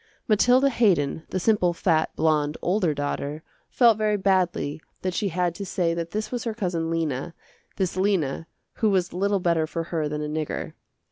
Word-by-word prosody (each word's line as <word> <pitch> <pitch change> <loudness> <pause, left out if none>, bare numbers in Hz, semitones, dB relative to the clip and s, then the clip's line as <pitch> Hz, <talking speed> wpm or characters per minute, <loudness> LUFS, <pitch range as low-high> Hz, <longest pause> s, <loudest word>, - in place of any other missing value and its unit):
Mathilda 250 +5 +4
Haydon, 165 - +1
the 185 - -2
simple, 180 -3 +2
fat, 165 -2 +1
blonde, 155 -1 +1
older 180 -2 +2
daughter 145 +1 -3 0.3
felt 230 -4 +4
very 210 -1 +2
badly 180 -6 0 0.2
that 185 -1 -1
she 205 - 0
had 175 -1 0
to 200 - -6
say 175 -3 0
that 170 0 -3
this 215 +3 -4
was 245 -2 -3
her 225 -2 -2
cousin 175 -6 -2
Lena, 165 -1 -2 0.4
this 190 -3 -1
Lena 185 -6 0 0.3
who 220 - +2
was 185 -3 +1
little 200 +2 +1
better 170 -3 +1
for 165 +1 -3
her 155 -3 0
than 150 0 -3
a - - -3
nigger. 155 0 -3
175 Hz, 180 wpm, -25 LUFS, 160-200 Hz, 0.4 s, Mathilda